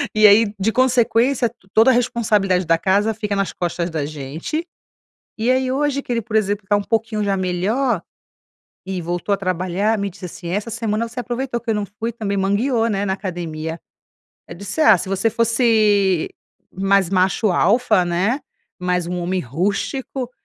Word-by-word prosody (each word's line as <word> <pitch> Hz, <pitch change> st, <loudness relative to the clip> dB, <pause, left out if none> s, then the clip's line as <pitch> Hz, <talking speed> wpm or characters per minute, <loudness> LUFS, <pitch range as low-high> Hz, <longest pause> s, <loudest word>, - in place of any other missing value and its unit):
E 215 Hz, 0 st, +7 dB
aí, 205 Hz, +1 st, +5 dB
de 220 Hz, +4 st, +1 dB
consequência, 245 Hz, 0 st, +2 dB
t 240 Hz, -, -27 dB, 0.2 s
toda 225 Hz, +4 st, +6 dB
a -, -, +3 dB
responsabilidade 210 Hz, -7 st, +1 dB
da 165 Hz, 0 st, +3 dB
casa 200 Hz, +5 st, +1 dB
fica 210 Hz, -2 st, -3 dB
nas 195 Hz, -1 st, -1 dB
costas 175 Hz, 0 st, -2 dB
da 155 Hz, -3 st, -2 dB
gente. 155 Hz, -, -5 dB, 0.7 s
E 225 Hz, +3 st, 0 dB
aí 260 Hz, 0 st, +1 dB
hoje 280 Hz, 0 st, 0 dB
que 245 Hz, -, -7 dB
ele, 230 Hz, -1 st, 0 dB
por 220 Hz, 0 st, -6 dB
exemplo, 205 Hz, -2 st, 0 dB
tá 205 Hz, -, +4 dB
um -, -, -1 dB
pouquinho 225 Hz, -1 st, -1 dB
já 195 Hz, -1 st, 0 dB
melhor, 190 Hz, +5 st, 0 dB, 0.8 s
e 190 Hz, -2 st, -3 dB
voltou 175 Hz, +4 st, -2 dB
a -, -, +1 dB
trabalhar, 185 Hz, +3 st, 0 dB
me 200 Hz, 0 st, -2 dB
disse 190 Hz, 0 st, -10 dB
assim: 175 Hz, 0 st, -8 dB
"Essa 205 Hz, +5 st, -2 dB
semana 225 Hz, 0 st, -2 dB
você 245 Hz, +2 st, -7 dB
aproveitou 245 Hz, 0 st, -3 dB
que 235 Hz, -, -7 dB
eu -, -, +1 dB
não 210 Hz, -1 st, -1 dB
fui 230 Hz, +1 st, -1 dB
também 205 Hz, -3 st, -3 dB
mangueou, 225 Hz, +5 st, +1 dB
né, 200 Hz, -1 st, -1 dB
na 190 Hz, -, 0 dB
academia." 165 Hz, -4 st, -5 dB, 0.7 s
Eu -, -, -8 dB
disse: 200 Hz, -, -5 dB
"Ah, 250 Hz, -, +6 dB
se 185 Hz, -, -5 dB
você 195 Hz, +4 st, +1 dB
fosse 215 Hz, -6 st, +2 dB, 0.4 s
mais 195 Hz, -1 st, +2 dB
macho 190 Hz, +3 st, +2 dB
alfa, 215 Hz, 0 st, +3 dB
né, 190 Hz, +11 st, 0 dB, 0.4 s
mais 180 Hz, -1 st, 0 dB
um 180 Hz, 0 st, -3 dB
homem 180 Hz, +1 st, -1 dB
rústico 205 Hz, -, -3 dB
205 Hz, 180 wpm, -20 LUFS, 185-230 Hz, 0.8 s, E